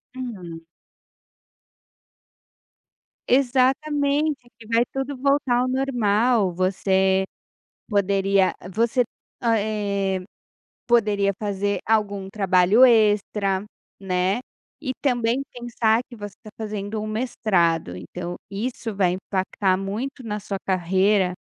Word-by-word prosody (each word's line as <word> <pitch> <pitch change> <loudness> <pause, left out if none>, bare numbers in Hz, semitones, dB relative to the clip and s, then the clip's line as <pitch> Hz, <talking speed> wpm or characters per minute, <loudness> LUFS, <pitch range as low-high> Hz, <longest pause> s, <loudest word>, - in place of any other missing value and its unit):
Hum. 185 -10 -7 2.7
Exatamente, 280 +3 +2
aqui 225 -2 -17
vai 230 +1 +3
tudo 270 +1 -3
voltar 275 -2 +2
ao 250 - +1
normal, 240 -5 +2
você 190 +1 +2 0.7
poderia 195 -2 +2 0.2
você, 235 +2 +2 0.4
a 230 -2 +2
eh, 200 -3 -1 0.7
poderia 210 -4 +3
fazer 200 -2 -1
algum 205 -3 0
trabalho 195 +3 +4
extra, 210 -4 +3 0.4
né, 185 +2 0 0.4
e 260 -4 -2
também 245 -1 +1
pensar 235 -2 +1
que 245 - -11
você 205 -1 -8
tá 215 - -11
fazendo 210 -1 -4
um 215 - -4
mestrado. 185 - 0
Então, 175 - -6
isso 225 +1 -4
vai 185 -3 +2
impactar 190 0 -1
muito 225 +8 -4
na 210 -2 -3
sua 200 -1 -4
carreira 190 +1 +2
210 Hz, 100 wpm, -23 LUFS, 190-240 Hz, 2.7 s, trabalho